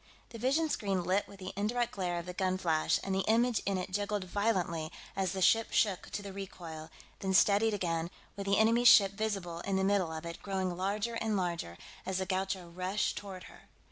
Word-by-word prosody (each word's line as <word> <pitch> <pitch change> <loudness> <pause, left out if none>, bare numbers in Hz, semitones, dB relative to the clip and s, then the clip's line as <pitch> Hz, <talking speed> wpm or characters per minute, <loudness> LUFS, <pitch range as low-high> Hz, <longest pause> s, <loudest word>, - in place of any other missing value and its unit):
The 230 - -9
vision 275 +7 +2
screen 195 - -1
lit 185 +3 +1
with 200 - -13
the 185 0 -6
indirect 235 +4 0
glare 180 -3 -2
of 170 - -4
the 180 - -6
gun 185 0 0
flash, 160 -4 +1
and 195 - -2
the 190 0 +1
image 235 0 +3
in 195 -1 +1
it 185 0 -4
jiggled 205 0 -1
violently 180 -5 -1 0.2
as 190 -2 0
the 190 -1 -1
ship 225 +4 +4
shook 200 -5 +1
to 205 - -4
the 200 -1 -7
recoil, 170 -5 -8 0.3
then 190 -1 0
steadied 210 +3 +4
again, 170 -3 -1 0.3
with 200 0 -5
the 200 0 +3
enemy 230 +2 +4
ship 200 -5 +8
visible 200 -5 -3
in 195 +2 -2
the 190 - +1
middle 195 -4 +2
of 160 +1 -6
it, 170 0 -7
growing 190 -2 -2
larger 205 +5 -1
and 220 -2 -1
larger 170 - -2 0.3
as 190 0 -2
the 190 - -1
Gaucho 190 -1 -2
rushed 185 +4 -1
toward 190 -3 -7
her. - - -15
190 Hz, 210 wpm, -32 LUFS, 180-205 Hz, 0.3 s, ship